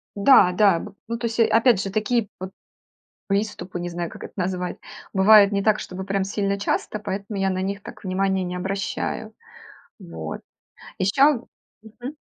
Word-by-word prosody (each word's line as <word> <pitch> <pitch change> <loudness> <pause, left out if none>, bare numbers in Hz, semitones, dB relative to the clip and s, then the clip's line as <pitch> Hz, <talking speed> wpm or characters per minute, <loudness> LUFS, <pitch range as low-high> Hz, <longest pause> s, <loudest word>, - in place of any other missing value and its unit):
Да-да. 200 -5 +5
Б 210 - -9
ну, 230 0 -3
то 235 - -4
есть, 230 +1 -5
э, 225 - +6
опять 230 -3 +4
же 195 - -3
такие 215 +2 0
п 185 +1 -7 0.8
приступы, 195 -3 -2
не 175 - -3
знаю, 170 -1 -4
как - - -10
это - - -10
назвать, 180 -1 -2 0.4
бывает 200 +1 +7
не 200 -1 +1
так, 215 0 +3
чтобы 185 +1 -6
прям 195 0 -1
сильно 200 0 -1
часто, 205 +1 -2
поэтому 200 0 -5
я 195 - +2
на 185 0 -1
них 200 +1 -3
так - - -11
внимания 190 0 0
не 180 0 -4
обращаю. 195 +3 -3 0.7
Вот. 80 -1 -7 0.6
Ещё 250 +6 +3 0.4
Мгм. 245 +6 -9
200 Hz, 165 wpm, -23 LUFS, 185-215 Hz, 0.8 s, бывает